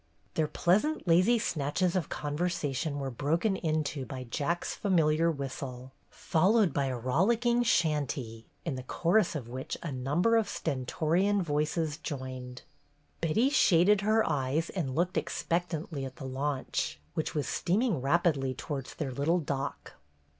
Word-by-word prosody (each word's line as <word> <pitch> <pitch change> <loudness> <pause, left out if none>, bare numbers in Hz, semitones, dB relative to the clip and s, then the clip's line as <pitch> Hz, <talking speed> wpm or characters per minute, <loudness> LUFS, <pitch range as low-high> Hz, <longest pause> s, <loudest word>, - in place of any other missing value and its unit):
Their 155 -1 +1
pleasant, 210 - +1
lazy 185 +8 +5
snatches 170 -1 0
of 180 -5 -1
conversation 150 -1 -2
were 135 -1 -3
broken 165 - 0
into 155 -5 -1
by 130 0 -6
Jack's 145 +8 -2
familiar 165 -4 +2
whistle, 135 -3 -5 0.2
followed 195 +4 +2
by 140 - +1
a 130 -2 -2
rollicking 225 - +2
chantey, 145 - 0 0.2
in 165 - -1
the 130 - -4
chorus 170 +8 +1
of 130 -6 -4
which 130 +2 -5
a 165 - -3
number 145 - +2
of 225 - +1
stentorian 165 +8 0
voices 150 0 -1
joined. 130 -3 -6 0.6
Betty 215 - +2
shaded 195 - +5
her 220 +2 +3
eyes 145 +2 0
and 140 -9 -3
looked 175 +2 0
expect 175 +1 -1
antly 155 -3 -4
at 130 -1 -6
the 135 - -8
launch, 130 - -2
which 160 - -2
was 145 -4 -1
steaming 195 - +1
rapidly 140 -3 +1
towards 140 -4 -5
their 135 - -3
little 145 +7 +1
dock. 140 -4 -4
155 Hz, 140 wpm, -30 LUFS, 135-180 Hz, 0.6 s, lazy